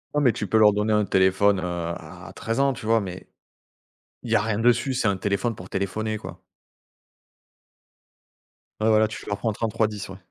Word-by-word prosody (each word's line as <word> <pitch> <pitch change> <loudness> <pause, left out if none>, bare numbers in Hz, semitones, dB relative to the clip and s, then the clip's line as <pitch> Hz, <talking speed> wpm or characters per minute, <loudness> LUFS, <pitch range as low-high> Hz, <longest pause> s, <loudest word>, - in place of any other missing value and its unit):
Non, 150 - +3
mais 130 -4 +5
tu 105 - -4
peux 110 - +2
leur 105 -1 +7
donner 105 +1 0
un 105 -1 +2
téléphone, 95 +1 +3
heu, - - -5
à 85 -1 -6
13 115 +3 -3
ans, 140 -1 +3
tu 120 -4 -9
vois? 115 0 +3
Mais 90 -2 -7 1.0
il 120 - -7
y - - +5
a - - +3
rien 110 -1 -1
dessus. 120 +3 +2
C'est 125 - -1
un 100 - +1
téléphone 100 +4 -1
pour 90 -2 -11
téléphoner, 110 +3 -2
quoi. 90 -3 -10 2.4
Ouais, 110 +1 +2
voilà, 110 0 +4
tu 110 - -8
leur 100 -1 -2
prends 110 +1 0
3310, 105 -2 -2
ouais. 95 - -9
105 Hz, 190 wpm, -24 LUFS, 95-110 Hz, 2.4 s, leur